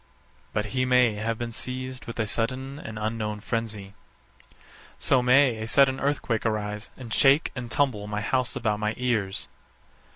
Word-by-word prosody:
_ - - -35 0.5
But 105 - -1
he 130 - +1
may 125 -3 +4
have 110 +2 -2
been 120 0 -4
seized 130 +2 -5
with 115 - -6
a 110 - +2
sudden 130 +6 -2
and 110 -5 -7
unknown 105 -1 -2
frenzy. 105 -3 -4 1.1
_So 130 -2 +3
may 125 -1 +5
a 110 0 -4
sudden 135 +2 +4
earthquake 135 -5 0
arise, 105 -1 -2
and 120 -4 -7
shake 140 +3 +4
and 120 -3 -5
tumble 115 -5 0
my 105 0 -2
house 125 +3 0
about 105 -2 0
my 105 +1 -1
ears. 110 -6 -1
115 Hz, 165 wpm, -26 LUFS, 105-130 Hz, 1.1 s, may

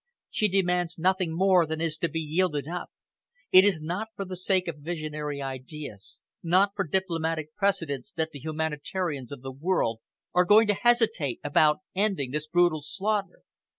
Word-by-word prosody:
She 215 - +2
demands 180 -3 +1
nothing 185 0 +1
more 180 0 +4
than 160 0 -3
is 165 -1 0
to 170 - 0
be 165 - -3
yielded 155 -2 0
up. 175 +2 -5 0.6
It 185 - +9
is 190 -6 +2
not 180 +7 -3
for 195 - -4
the 185 0 -6
sake 185 0 +1
of 155 -3 -5
visionary 150 -2 -4
ideas, 130 -4 -8 0.2
not 185 +4 +3
for 195 - -1
diplomatic 165 -3 -1
precedence 195 -4 -1
that 160 -2 -1
the 145 - -8
humanitarians 155 -1 -3
of 135 -3 -8
the 135 - -5
world 135 -6 0 0.3
are 180 - +5
going 215 +4 +6
to - - +5
hesitate 220 - +2
about 150 +3 +3
ending 190 -10 0
this 150 +2 -3
brutal 175 -1 +3
slaughter." 200 +4 -2
165 Hz, 165 wpm, -27 LUFS, 150-190 Hz, 0.6 s, It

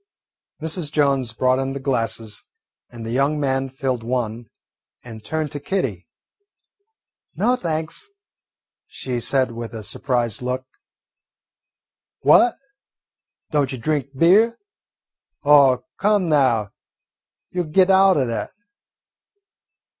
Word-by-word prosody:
Mrs. 160 -1 -3
Jones 140 -5 +1
brought 130 +3 +1
in 135 0 -2
the 140 - -5
glasses, 115 -5 -3 0.5
and 115 -2 -9
the 115 - -4
young 140 +4 +1
man 135 -1 0
filled 130 -2 -3
one 115 -1 -3 0.6
and 110 -3 -10
turned 155 -2 -3
to 145 - -5
Kitty. 125 - -3 1.3
"No, 250 - +2
thanks," 160 - -4 0.8
she 125 -2 -4
said 130 +1 +1
with 115 -1 -7
a 110 - -6
surprised 120 +1 -1
look. 125 +1 -3 1.6
"What, 240 - +5 1.0
don't 145 -3 +1
you 130 - -4
drink 145 +2 -1
beer? 205 - +4 0.9
Oh, 140 -4 +5 0.2
come 205 -3 +2
now, 120 -9 +2 0.8
you 180 - -1
'll - - -4
get 185 +4 +4
out 190 -1 +5
o' 135 - +2
that." 115 -1 -3
135 Hz, 115 wpm, -21 LUFS, 120-155 Hz, 1.6 s, What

